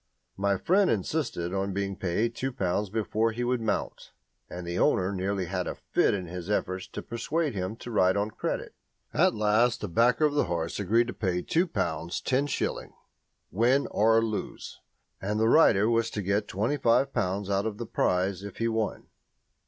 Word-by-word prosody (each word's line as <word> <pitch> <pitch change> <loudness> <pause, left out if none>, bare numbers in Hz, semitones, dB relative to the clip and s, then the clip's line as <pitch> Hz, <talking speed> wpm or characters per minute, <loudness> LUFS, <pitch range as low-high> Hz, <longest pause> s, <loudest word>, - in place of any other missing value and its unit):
My 100 0 +1
friend 190 - +3
insisted 95 - -1
on 95 0 -1
being 100 -1 -2
paid 105 +4 -1
two 135 +3 -3
pounds 100 -2 -1
before 110 +1 0
he 120 +2 -3
would 125 0 0
mount, 110 - -3 0.4
and 90 0 -7
the 85 +1 -3
owner 95 +1 +2
nearly 95 0 -1
had 90 0 -3
a - - -3
fit - - +1
in 95 -2 -4
his 90 +2 -7
efforts 95 -3 -1
to - - -7
persuade 145 +6 -2
him 95 +1 -3
to 120 +1 -9
ride 95 -3 +3
on 105 +2 -1
credit. - - -4 0.4
At - - +3
last 110 +3 +2
a - - -1
backer 120 - +3
of 150 - +1
the 145 - +2
horse 85 0 -3
agreed 110 +4 +3
to 120 - -5
pay 90 -4 -1
2 175 +3 +1
pounds 85 - -2
10s., 140 +2 -1 0.6
win 125 - +3
or 115 +2 +4
lose, 110 -2 -5 0.4
and 105 +2 -1
the 110 - +3
rider 110 -7 +5
was 115 0 +2
to 105 - -4
get 100 +3 0
25 125 +5 +1
pounds 100 -3 -1
out 100 +2 +1
of 105 -2 -4
the 120 - -5
prize 95 -2 0
if 100 -1 -9
he 115 - 0
won. 110 -2 -2
105 Hz, 185 wpm, -28 LUFS, 95-115 Hz, 0.6 s, rider